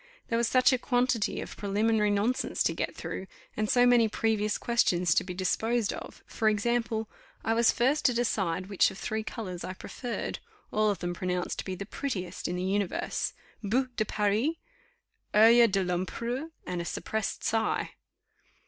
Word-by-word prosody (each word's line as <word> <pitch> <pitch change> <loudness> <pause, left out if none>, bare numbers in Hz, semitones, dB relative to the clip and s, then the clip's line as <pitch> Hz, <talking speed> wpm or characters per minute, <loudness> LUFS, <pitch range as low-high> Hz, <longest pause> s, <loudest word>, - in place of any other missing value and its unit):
There 230 - +1
was 235 - +2
such 255 +2 +4
a 255 - +1
quantity 245 -4 +1
of - - -8
preliminary 210 +1 +1
nonsense 210 +5 +1
to - - +1
get - - -3
through, 190 - -5 0.3
and 215 0 -1
so 245 -1 +5
many 240 -2 +5
previous 215 -1 0
questions 180 -8 +2
to - - +2
be 180 -1 -6
disposed 220 +4 0
of: - - -9
for 220 -1 +1
example, 225 +1 0 0.4
I 225 - +1
was 230 0 +4
first 265 +5 +1
to 250 - +5
decide 190 -7 0
which 195 -1 +3
of 195 - -10
three 220 +2 -2
colours 190 -5 -6
I 185 - -4
preferred, 240 +5 -5 0.3
all 215 0 +2
of 200 - 0
them 175 0 -3
pronounced 180 0 -2
to - - -4
be 190 - -3
the 200 +2 -6
prettiest 190 -8 -4
in, 175 - -2
the 180 - -2
universe, 195 0 -1 0.3
boue 250 +6 +1
de - - +1
Paris, 210 +9 +1 0.8
oeil 230 +2 +8
de 195 -2 +1
l'empereur, 230 - -2 0.2
and 180 -1 -3
a - - -5
suppressed 220 +4 -3
sigh. 225 0 0
215 Hz, 175 wpm, -29 LUFS, 190-235 Hz, 0.8 s, oeil